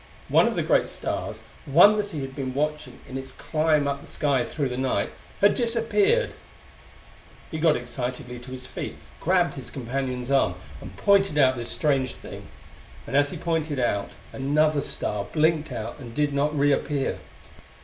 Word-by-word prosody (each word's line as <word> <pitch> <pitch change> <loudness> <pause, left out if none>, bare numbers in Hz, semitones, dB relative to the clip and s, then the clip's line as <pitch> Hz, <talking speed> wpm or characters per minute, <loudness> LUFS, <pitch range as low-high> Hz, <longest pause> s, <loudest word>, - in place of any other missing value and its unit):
One - - +5
of - - -1
the - - 0
great - - +3
stars, - - -4 0.3
one 175 +9 +7
that 205 -1 -1
he 155 -7 -5
had 135 0 -6
been 130 -2 -4
watching 150 -3 -2
in 130 - -5
its 135 0 -9
climb 155 -2 +1
up 140 0 -2
the - - -13
sky 140 -5 +1
through 140 +1 -2
the 125 - -4
night, 130 0 0 0.3
had 205 - +6
disappeared! 255 - +2 1.2
He 160 - -3
got 155 -1 +4
excitedly 125 +1 -4
to 120 +2 -11
his 130 -1 -7
feet, - - -6 0.2
grabbed 180 0 +2
his 135 -4 -8
companion's 130 0 -3
arm 135 -10 +3 0.3
and - - -10
pointed 195 -6 +3
out 130 -3 +5
this 120 -1 -4
strange 135 -4 0
thing - - -10 0.6
and - - -4
as 145 0 +4
he - - -5
pointed 160 -4 -1 0.6
another 145 +2 +2
star 105 -6 -2
blinked 155 +4 +1
out 115 +6 -5
and 120 -4 -9
did 145 -1 +1
not 145 +2 +1
reappear. 140 0 +1
145 Hz, 170 wpm, -25 LUFS, 130-155 Hz, 1.2 s, one